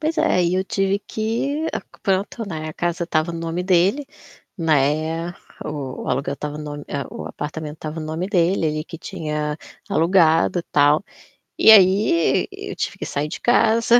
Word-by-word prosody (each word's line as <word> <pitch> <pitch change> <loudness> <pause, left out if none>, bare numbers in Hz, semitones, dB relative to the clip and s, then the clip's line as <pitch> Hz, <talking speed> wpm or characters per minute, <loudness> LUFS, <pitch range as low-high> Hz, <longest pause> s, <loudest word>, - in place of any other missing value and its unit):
Pois 320 +1 -1
é, 180 - +3
e 170 +1 +1
eu 190 +1 +1
tive 195 +1 0
que 235 +10 -2 0.4
pronto, 200 +4 -1
né, 155 -2 -5
a - - -6
casa 175 +1 -2
estava 165 0 0
no 165 - -5
nome 165 +2 -2
dele, 190 +10 +2 0.5
né, 160 +1 +1 0.4
o 140 -4 -5
o - - -7
aluguel 135 +2 -1
estava 150 +1 -5
no 150 - -6
nome 145 -1 -6 0.3
o - - -7
apartamento 150 0 -6
estava 155 +1 -6
no 155 - -5
nome 160 +4 -3
dele, 180 -3 +2
ele 155 0 -2
que 165 - -9
tinha 150 -4 -3 0.3
alugado, 165 0 +3
tal. 145 +4 +4 0.5
E - - +8
aí 190 -4 +5
e - - -7
eu - - -6
tive - - -3
que - - -5
sair 145 +1 -2
de 155 - -6
casa, 230 0 +4
165 Hz, 175 wpm, -21 LUFS, 155-195 Hz, 0.5 s, E